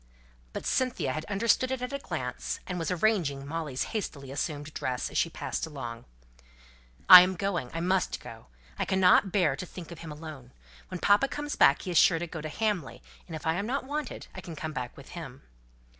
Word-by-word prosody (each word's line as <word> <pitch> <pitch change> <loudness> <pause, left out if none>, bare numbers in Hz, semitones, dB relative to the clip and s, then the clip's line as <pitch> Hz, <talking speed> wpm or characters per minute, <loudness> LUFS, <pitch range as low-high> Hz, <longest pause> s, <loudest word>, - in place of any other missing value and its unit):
But - - -6
Cynthia 255 - 0
had 155 +2 -4
understood 230 +5 +2
it 260 -1 -2
at 250 +2 -4
a 280 - -2
glance, - - -4
and 180 -1 -4
was 165 - -2
arranging 170 -7 +1
Molly's 150 -3 -3
hastily 140 -11 -4
assumed 145 +1 -4
dress, 125 -1 -2
as - - -3
she 165 - +2
passed 165 - -4
along. 120 -6 -7 1.0
"I 180 -1 +13
am 185 +1 +1
going. 180 -9 -2
I 165 - -3
must 185 0 +1
go. - - -11 0.3
I - - +2
cannot 190 0 +4
bear 170 -9 +2
to - - -6
think 175 -1 -10
of 170 - -9
him 165 -2 -8
alone. 150 -5 -9 0.3
When 185 - -6
papa 205 +9 +4
comes 295 +1 -4
back 140 - +5
he 185 - -4
is 170 - +5
sure 165 - +5
to 170 - -3
go 160 -2 -7
to 155 - -5
Hamley, 205 -4 -2 0.2
and 165 - -6
if 155 - -8
I 160 - +2
am 200 +5 -2
not 275 +4 -1
wanted, 290 +2 -4
I 185 - -7
can 170 -2 -8
come 155 +1 -5
back 125 -3 -5
with 135 - -12
him." 135 -7 -9
170 Hz, 210 wpm, -29 LUFS, 145-200 Hz, 1.0 s, I